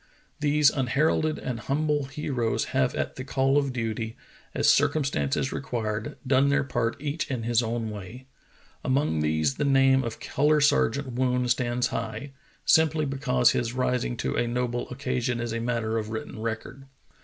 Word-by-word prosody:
These 150 0 +4
unheralded 150 +4 +1
and 125 -3 -4
humble 145 +3 0
heroes 135 -4 -2
have 65 - +1
at - - -3
the 130 - -4
call 135 0 +1
of 140 -2 -1
duty, 115 -2 -3 0.4
as - - +2
circumstances 135 - +2
required, 110 -4 -3
done 135 +1 +3
their 140 0 +2
part 115 -2 -2
each 150 +2 -3
in 125 -4 -2
his 120 +1 +2
own 115 -1 -2
way. 105 +5 -9 0.6
Among 130 - +1
these 80 - +1
the - - 0
name 135 -1 +4
of 115 -2 -5
Color 150 +2 +2
Sergeant 140 -2 +2
Woon 125 0 +1
stands 125 0 +1
high, 115 +6 -4 0.3
simply 160 -1 +4
because 135 -3 +2
his 120 0 -1
rising 125 -1 -1
to - - -2
a 120 - +1
noble 120 0 -2
occasion 125 -2 -2
is 120 -1 -3
a 115 - -2
matter 115 -1 -1
of 105 -1 -5
written 110 0 -6
record. 115 +4 -5
125 Hz, 160 wpm, -26 LUFS, 115-140 Hz, 0.6 s, These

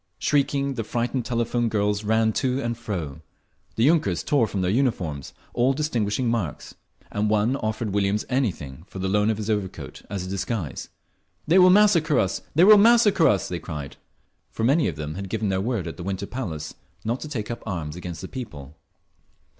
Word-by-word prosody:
Shrieking, 140 -1 +1
the 115 -3 -3
frightened 120 +2 -2
telephone 120 0 0
girls 105 -1 0
ran 110 +1 +2
to 130 +1 0
and 120 -3 -2
fro; 85 -10 -5 0.5
the 110 - +1
yunkers 120 - +2
tore 140 -6 +3
from 100 - -3
their 90 0 +1
uniforms 95 - -1 0.2
all 125 +3 +3
distinguishing 125 -5 -1
marks, 110 -10 -2 0.4
and 105 +1 0
one 110 +4 +2
offered 110 -3 -3
Williams 100 +1 +1
anything 85 - -2
for - - -10
the 95 0 -2
loan 105 +2 +2
of 110 - 0
his 105 -1 -4
overcoat, 105 -4 -3
as 100 -3 -4
a - - -7
disguise…. 95 - -3 0.6
"They 175 +4 +5
will 185 0 +8
massacre 180 -7 +5
us! 95 -4 0
They 165 - +6
will 210 +1 +9
massacre 225 -5 +5
us!" 100 -2 +2
they 90 - -4
cried, 75 -5 -7 0.5
for 110 - -5
many 140 +7 +3
of 85 - -3
them 75 -1 -5
had 95 +2 -6
given 110 -1 -1
their 95 0 0
word 115 -3 -1
at 85 - -6
the 85 - -7
Winter 95 +1 -3
Palace 90 -12 -5 0.3
not 120 +4 -1
to 155 - -7
take 115 -6 -4
up 120 - -5
arms 85 -6 -4
against 90 -3 -7
the - - -6
People. 80 - -8
110 Hz, 190 wpm, -24 LUFS, 95-130 Hz, 0.6 s, will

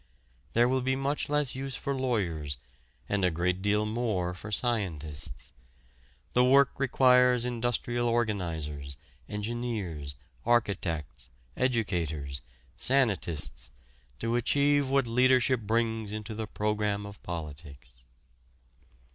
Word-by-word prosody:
There 120 +1 +5
will 130 +1 +1
be 130 +1 +1
much 140 +2 -1
less 150 -3 +2
use 135 0 -4
for 140 - -2
lawyers 90 - -1 0.5
and 100 -1 0
a 90 - +5
great 90 +3 0
deal 105 +1 +2
more 105 -6 -1
for 100 +4 -9
scientists. 90 - -2 0.8
The 125 - +5
work 135 +2 +6
requires 125 -2 +5
industrial 120 0 -1
organizers, 80 - -1 0.3
engineers, 105 - -3 0.3
architects, 95 - 0 0.3
educators, 85 - -1 0.3
sanitists 100 - +1 0.5
to 115 - -1
achieve 140 +3 +3
what 135 -1 +3
leadership 125 +1 +4
brings 110 -1 -1
into 110 +1 -5
the 110 0 -4
program 105 -1 -1
of 100 0 -10
politics. 70 -7 -8
110 Hz, 105 wpm, -29 LUFS, 85-125 Hz, 0.8 s, work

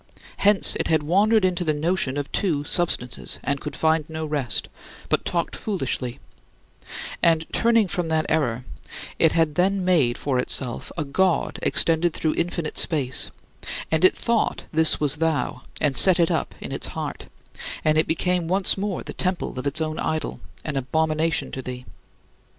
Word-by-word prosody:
Hence 205 -1 +3
it - - -1
had 160 -2 +2
wandered 200 +6 +3
into 180 -1 0
the 155 -3 0
notion 150 -3 0
of 145 -1 -4
two 160 -8 0
substances, 145 -6 -1
and 140 0 -2
could 150 - -6
find 160 -1 +1
no 160 0 -4
rest, 145 -6 -2 0.4
but - - +2
talked 170 -1 -2
foolishly, 135 - -3 1.0
And 165 -1 +3
turning 230 -3 +3
from 180 -2 -2
that 160 -1 0
error, 125 -6 0 0.5
it 160 - +4
had 165 -2 +2
then 190 +3 +1
made 145 -10 +2
for 135 -3 -1
itself 125 -1 0
a 160 - 0
god 180 +5 0
extended 165 0 +2
through 155 - 0
infinite 170 -2 -1
space; 135 -6 +1 0.6
and 160 +1 +1
it 185 - +6
thought 235 -2 0
this 160 0 +4
was 150 -1 0
thou 160 -1 -1 0.2
and 145 -3 +1
set 185 -2 +8
it 170 - +3
up - - -2
in - - -7
its - - -1
heart, - - -5 0.6
and 155 0 +3
it 155 - +2
became 175 +1 0
once 190 +2 +2
more 200 -2 -3
the - - -8
temple 185 -7 -2
of 130 - -3
its 145 +3 -2
own 155 0 -2
idol, 155 0 -3 0.3
an 150 -3 -3
abomination 155 +4 0
to 130 - -5
thee. 125 0 -7
160 Hz, 165 wpm, -23 LUFS, 145-180 Hz, 1.0 s, set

